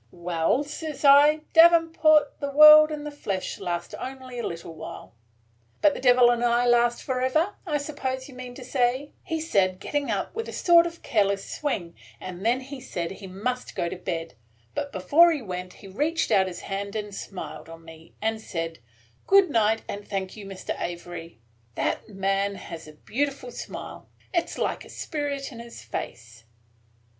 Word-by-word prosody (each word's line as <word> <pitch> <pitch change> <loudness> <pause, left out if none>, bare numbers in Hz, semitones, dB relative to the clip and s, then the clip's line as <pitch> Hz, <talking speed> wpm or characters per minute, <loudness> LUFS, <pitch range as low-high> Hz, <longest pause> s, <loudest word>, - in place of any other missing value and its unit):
"'Well,' 175 - 0
says 300 0 -6
I, 290 +2 +7
'davenport, 325 -3 +5
the 280 - -3
world 305 +2 +9
and 300 -1 -5
the 295 - -5
flesh 200 -10 -4
last 175 -1 -4
only 260 -1 -7
a - - -2
little 170 -1 -7
while 160 -6 -9 0.2
– 115 0 -39
' 115 0 -39
"'But 300 - +6
the - - -6
Devil 245 -1 +6
and 240 0 0
I 240 0 +3
last 240 0 +3
forever, 260 +9 0
I 300 -2 +1
suppose 265 -3 -4
you 275 - -12
mean 250 -1 -9
to 255 - -9
say,' 255 +2 0 0.3
said 195 - +2
he, - - -19
getting 285 +7 -2
up 200 -3 -2
with 455 0 -4
a - - -7
sort 345 -1 +5
of 335 0 -10
careless 200 -3 +1
swing; 190 - -3 0.3
and 185 0 -8
then 240 +4 +2
he 270 0 -9
said 175 -9 -4
he 195 0 -9
must 245 +7 -4
go 170 - -1
to - - -5
bed; 170 -2 -4 0.4
but 285 - -3
before 295 - +5
he 295 -6 -2
went 180 -2 -6
he 195 - -14
reached 295 - -1
out 190 -3 +4
his 180 -2 -7
hand 200 +1 -5
and 210 -1 -4
smiled 195 -3 -7
on 165 0 -12
me, 165 0 -14
and 220 0 -1
said, 165 -6 -5 0.5
'Good 390 -4 +5
night, 225 -2 +2
and 205 0 -6
thank 195 -2 -4
you, 205 -2 -9
Mr. 195 -1 -5
Avery.' 175 -2 -6 0.4
That 100 - -2
man 195 0 0
has 165 -4 -9
a 155 - -12
beautiful 265 - -3
smile. - - -8 0.2
It 340 -2 +1
's - - -8
like - - -2
a - - -14
spirit 285 -3 -4
in 235 - -10
his 235 0 -10
face." 115 0 -7
235 Hz, 185 wpm, -26 LUFS, 185-285 Hz, 0.5 s, world